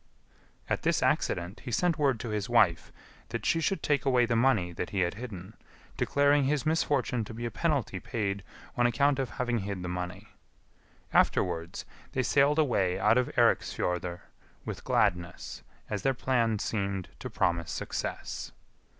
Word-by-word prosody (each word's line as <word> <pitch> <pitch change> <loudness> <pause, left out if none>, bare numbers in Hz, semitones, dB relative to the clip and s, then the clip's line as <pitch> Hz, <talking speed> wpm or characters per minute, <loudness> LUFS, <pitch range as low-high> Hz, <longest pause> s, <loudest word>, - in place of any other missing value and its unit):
At - - -1
this - - +1
accident 90 +5 0
he 125 - -7
sent 165 +6 +1
word 135 -6 +2
to 120 - -4
his 105 +1 -2
wife 110 -8 +3 0.4
that 115 -2 -4
she 165 - +2
should 195 +4 0
take 145 -1 +2
away 125 -3 +4
the 115 - 0
money 115 -8 +3
that 85 - -4
he 100 -3 -1
had 85 -1 +1
hidden, 105 -3 -8 0.4
declaring 145 0 +3
his 145 +2 0
misfortune 145 -6 +1
to 110 +1 -8
be 120 +1 -4
a 120 - -3
penalty 140 - 0
paid 100 -3 -2 0.3
on 120 0 +4
account 140 +4 +2
of 135 - -1
having 120 -3 -1
hid 100 -2 -4
the - - -3
money. 90 +4 -5 0.8
Afterwards 85 -1 +1 0.3
they 130 - +1
sailed 140 +4 +3
away 100 - +2
out 110 +4 +4
of 125 - +1
Eiriksfjordr 90 0 +1 0.4
with - - -5
gladness, 90 0 0 0.3
as 105 -2 -3
their 135 -1 +1
plan 120 -4 +1
seemed 100 -3 -2
to - - -5
promise 85 -2 0
success. - - -4
115 Hz, 160 wpm, -29 LUFS, 95-135 Hz, 0.8 s, away